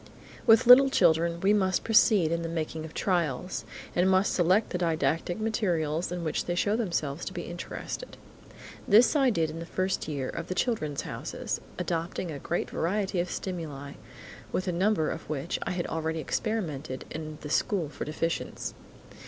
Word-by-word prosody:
With 225 +1 +7
little 260 +3 +9
children, 170 - +3
we 200 +2 +4
must 190 -3 +2
proceed 210 -6 +5
to 170 - +1
the 165 0 -4
making 160 -1 -3
of 160 - -10
trials, 175 -2 -1 0.3
and 180 +2 +3
must 190 +1 +3
select 185 +5 +3
the 180 - -2
didactic 165 +2 0
materials 175 -8 0
in 175 -1 -3
which 155 - -1
they 175 - -1
show 205 +4 +2
themselves 170 -9 -2
to 190 - -5
be 175 -2 -4
interested. 175 - -6 0.7
This 225 +8 +6
I 270 -3 +4
did 165 -8 0
in 165 - -7
the 165 - -5
first 185 +1 -1
year 140 -4 -2
of 170 0 -5
the 185 - -3
"Children's 155 - -1
Houses" - - -4 0.2
adopting 170 +1 -2
a 145 - -6
great 170 - -2
variety 190 +2 -1
of 175 +1 -1
stimuli, 150 -8 -5 0.6
with 185 - -2
a - - +2
number 180 -2 +1
of - - -7
which 155 +2 -2
I - - 0
had 180 -1 -2
already 160 0 -2
experimented 155 - -3
in 155 -1 -6
the 150 - -7
school 185 -4 +1
for 145 - -6
deficients. 165 +2 -3
175 Hz, 175 wpm, -28 LUFS, 160-195 Hz, 0.7 s, little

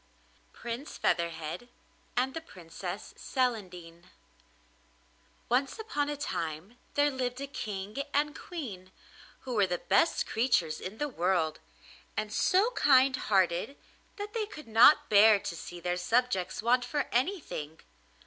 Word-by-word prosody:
PRINCE 240 +5 -6
FEATHERHEAD 170 +5 -1 0.5
AND 260 +2 +1
THE 325 - -5
PRINCESS 175 - -8
CELANDINE 180 -9 -3 1.4
Once 265 - +1
upon 295 -10 -2
a 295 - -3
time 170 - -4 0.2
there 290 0 +3
lived 255 -1 -3
a 280 - -3
King 210 -6 -6
and 295 +1 +1
Queen, 205 - -7 0.5
who 255 - -5
were 205 -4 +3
the 175 -1 -1
best 200 - +2
creatures 220 -10 +1
in 195 +4 -6
the 295 - -1
world, 175 - 0 0.6
and 215 0 -2
so 395 - +3
kind 265 - +5
hearted 190 +3 +1 0.4
that 415 +1 -6
they 440 -2 -1
could 305 - -11
not 265 +7 +6
bear 210 0 +7
to 170 - -5
see 175 +1 -8
their 175 +1 -1
subjects 190 -2 0
want 245 +2 +3
for 280 +3 -2
anything. 245 - -2
230 Hz, 130 wpm, -30 LUFS, 180-280 Hz, 1.4 s, bear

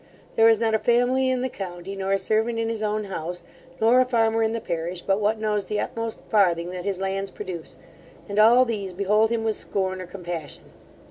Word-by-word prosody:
There 225 0 +6
is 225 -2 +4
not 225 -1 +1
a 220 - +3
family 245 +4 +2
in 255 -1 0
the - - +1
county 190 -4 -7
nor 195 0 -2
a - - +4
servant 220 +4 0
in 225 0 -1
his 225 -1 -3
own 215 0 -1
house, 175 -3 -5 0.4
nor 235 +3 +5
a - - +3
farmer 225 -2 +2
in 220 0 +2
the 230 - -2
parish, 170 -2 -4
but 195 +1 +1
what 215 +2 +2
knows 210 -2 -1
the 210 - -2
utmost 230 -1 -3
farthing 175 -5 +2
that 180 0 -6
his 195 -2 -2
lands 195 0 -2
produce, 185 -5 -7 0.5
and 205 0 -1
all 240 +4 +7
these 200 -6 -3
behold 210 +4 +2
him 230 -1 -1
with 220 -1 0
scorn 190 -1 -2
or 180 - -8
compassion. 175 -4 -7
210 Hz, 215 wpm, -24 LUFS, 190-225 Hz, 0.5 s, all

